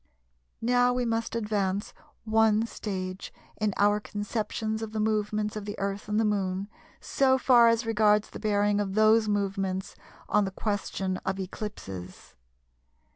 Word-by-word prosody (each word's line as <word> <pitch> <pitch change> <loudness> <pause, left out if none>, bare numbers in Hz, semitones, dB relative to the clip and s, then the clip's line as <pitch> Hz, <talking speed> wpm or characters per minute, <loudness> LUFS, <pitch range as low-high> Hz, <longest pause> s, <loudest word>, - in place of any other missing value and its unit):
] - - -46
Now 245 0 +4
we 250 0 0
must 230 0 -1
advance 205 -3 -1 0.3
one 220 0 +3
stage 190 -4 -5 0.3
in 215 -1 0
our 205 +1 +3
conceptions 215 +1 -3
of 220 -1 -5
the 220 - -2
movements 215 0 0
of 210 -1 -5
the 205 - -5
Earth 200 +1 -3
and 210 +1 +1
the 225 - +2
Moon, 195 -1 -1 0.3
so 265 -1 +2
far 245 -3 +6
as 230 0 +2
regards 210 -2 +3
the - - -8
bearing 205 -1 +1
of 195 -1 -2
those 215 0 +4
movements 195 -2 -2 0.3
on 210 - +3
the 195 - -1
question 195 -2 -2
of 190 +1 -3
eclipses. 185 - -7
210 Hz, 150 wpm, -28 LUFS, 195-220 Hz, 0.3 s, far